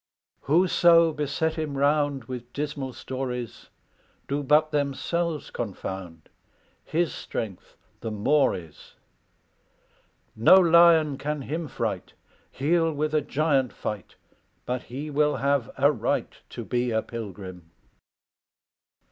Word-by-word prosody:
"Whoso 170 +1 +4
beset 150 +2 -1
him 150 -3 -3
round 145 -1 +1
With 125 0 -8
dismal 145 -3 -4
stories, 125 -1 -5 0.6
Do 140 +1 -1
but 150 +2 +3
themselves 150 +3 -1
confound 95 -6 -6 0.6
His 170 0 0
strength 100 -5 -6 0.2
the 115 - -4
more 125 +8 +2
is. 80 -4 -12 1.4
No 115 +11 +7
lion 170 -5 +6
can 150 -1 -3
him 160 +4 -4
fright; 115 -8 -4 0.4
He'll 165 +4 +1
with 155 +1 -2
a 155 - +3
giant 140 -3 +1
fight, 105 -4 -6 0.5
But 125 0 -2
he 140 +5 -7
will 150 +1 +2
have 135 -1 0
a 140 +2 +5
right 125 - -1 0.2
To - - -7
be 125 0 0
a 110 -1 0
pilgrim. 95 -6 -8
140 Hz, 115 wpm, -26 LUFS, 120-155 Hz, 1.4 s, No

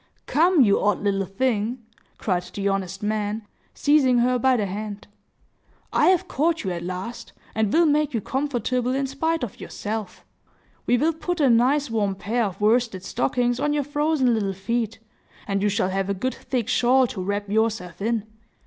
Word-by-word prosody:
"Come, 335 +1 +4
you 200 -3 +3
odd 205 0 +1
little 195 -2 0
thing!" 230 +2 -1 0.3
cried 180 -4 0
the 195 +3 -4
honest 195 0 -2
man, 210 0 -2 0.3
seizing 285 -4 +4
her 250 +1 +2
by 260 +1 +3
the 210 - 0
hand, 205 +1 -5 0.9
"I - - +4
have 370 0 +3
caught 330 0 0
you 190 - -2
at 170 -1 -4
last, 185 +7 -6 0.2
and 220 -2 0
will 335 +1 +4
make 300 -1 +2
you 230 - -1
comfortable 255 0 -1
in 275 0 0
spite 320 +4 -1
of 225 - -5
yourself. 210 -3 -5 0.6
We 245 - +4
will 315 +6 +2
put 350 +2 -3
a 275 -5 +4
nice 265 +4 +3
warm 205 -3 0
pair 225 +4 -1
of 195 -2 -5
worsted 220 -3 +2
stockings 245 +3 0
on 295 +1 +1
your 295 -1 +1
frozen 290 -3 +1
little 200 -3 0
feet, 225 +4 -2 0.5
and 195 -1 0
you 205 - +2
shall 195 -2 0
have 195 +1 -1
a 200 - 0
good 255 +7 -2
thick 245 -5 -3
shawl 255 +1 +4
to 215 -5 -5
wrap 200 +2 -2
yourself 210 -4 -1
in. 225 0 0
230 Hz, 180 wpm, -24 LUFS, 200-265 Hz, 0.9 s, Come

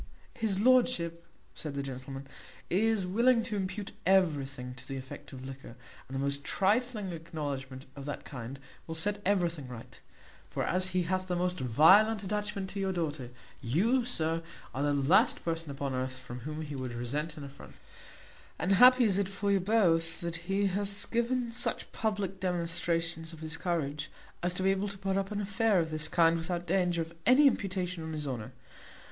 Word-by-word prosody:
"His 210 -4 0
lordship," 210 -9 +3 0.3
said 150 -3 -6
the 140 - -2
gentleman, 135 +1 -6 0.5
"is 210 +1 +2
willing 230 +5 +3
to 225 -2 -4
impute 195 +1 -3
everything 140 -9 +1
to 125 - -12
the 135 - -4
effect 130 0 -9
of 130 -1 -8
liquor, 135 -3 -9 0.3
and 130 - -7
the - - -1
most 140 +1 -1
trifling 210 +3 +1
acknowledgment 145 -5 -5
of 140 -1 -8
that 145 - -5
kind 130 0 -7 0.3
will 165 - -4
set 205 +5 +1
everything 170 -8 0
right; 120 -2 -10 0.5
for - - -2
as 185 +1 +1
he 185 -1 0
hath 185 +2 -1
the 180 - -1
most 180 +1 -1
violent 190 - +5
attachment 205 -1 -2
to 200 - -5
your 195 -1 0
daughter, 155 -8 -3 0.3
you, 205 - +2
sir, 165 -9 0 0.3
are 135 - -2
the 145 0 +2
last 140 +5 +3
person 165 -2 -2
upon 140 -1 -3
earth 130 0 -2
from 125 -1 -8
whom 155 +5 -5
he 150 -1 -6
would 130 -2 -4
resent 145 +7 -3
an 150 - -7
affront; 140 0 -11 0.8
and 185 - 0
happy 250 +5 +8
is 200 -4 +3
it 195 -1 0
for 200 +1 -1
you 200 - +4
both 175 -5 +2
that 170 0 -5
he 200 +1 +2
hath 200 +1 -2
given 235 +1 0
such 240 - -1
public 205 -3 -2
demonstrations 165 -2 -1
of 160 - -11
his 160 0 -4
courage 155 -4 -2 0.3
as 175 0 +1
to 185 - -1
be 190 - +4
able 195 +1 0
to 200 -1 -6
put 195 0 -1
up 195 +1 -1
an 205 - -2
affair 205 +1 +2
of 160 -1 -1
this 155 -1 0
kind 165 -1 +4
without 175 +1 -3
danger 175 -1 +1
of 165 +1 -12
any 260 +4 +7
imputation 185 -8 +1
on 160 0 -5
his 150 -2 -3
honour. 120 -5 -4
175 Hz, 185 wpm, -31 LUFS, 145-200 Hz, 0.8 s, happy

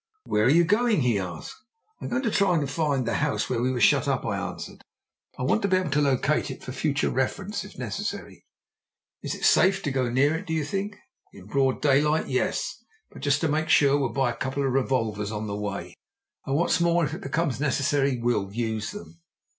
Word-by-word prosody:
"Where 105 - +1
are - - +5
you 170 +5 +5
going?" 210 +1 +2
he 120 -5 +2
asked. 90 -4 -6 0.5
"I'm - - -4
going 245 +2 -1
to 225 - 0
try 200 -4 +3
and 145 -3 0
find 140 -3 0
the - - 0
house 150 -1 0
where 120 -2 0
we 125 - +1
were 125 - -2
shut - - +4
up," - - 0
I - - -1
answered. - - -6 0.6
"I - - -4
want 175 +11 +2
to 200 - +1
be 185 -1 +3
able 185 -5 -2
to 145 +1 +2
locate 140 +2 +1
it 130 - -8
for - - -6
future 140 +2 0
reference, 190 +11 -2
if - - -13
necessary." - - -5 0.8
"Is - - -3
it - - -3
safe 195 +1 +4
to 145 - -1
go 130 -2 0
near 135 +5 +3
it, 185 +4 -6
do 160 - -2
you 160 -1 0
think?" 200 +5 -3 0.4
"In 95 - -13
broad 135 +5 0
daylight, 150 +2 +3
yes! - - -1 0.3
But, - - -12
just 145 +1 +1
to 160 - +2
make 155 +1 -1
sure, 140 -2 +5
we'll 140 -3 +1
buy 125 +2 0
a - - -7
couple 135 +2 -2
of 130 - 0
revolvers 115 -6 0
on 105 0 -4
the 100 -1 -4
way. 105 -1 -5 0.5
And, 135 - 0
what's 170 +2 +2
more, 170 -1 +3
if 150 - -4
it 175 - -6
becomes 165 - -1
necessary, 140 -1 +1
we'll 115 -5 -1
use 110 -1 -2
them." 85 0 -10
140 Hz, 220 wpm, -26 LUFS, 120-160 Hz, 0.8 s, are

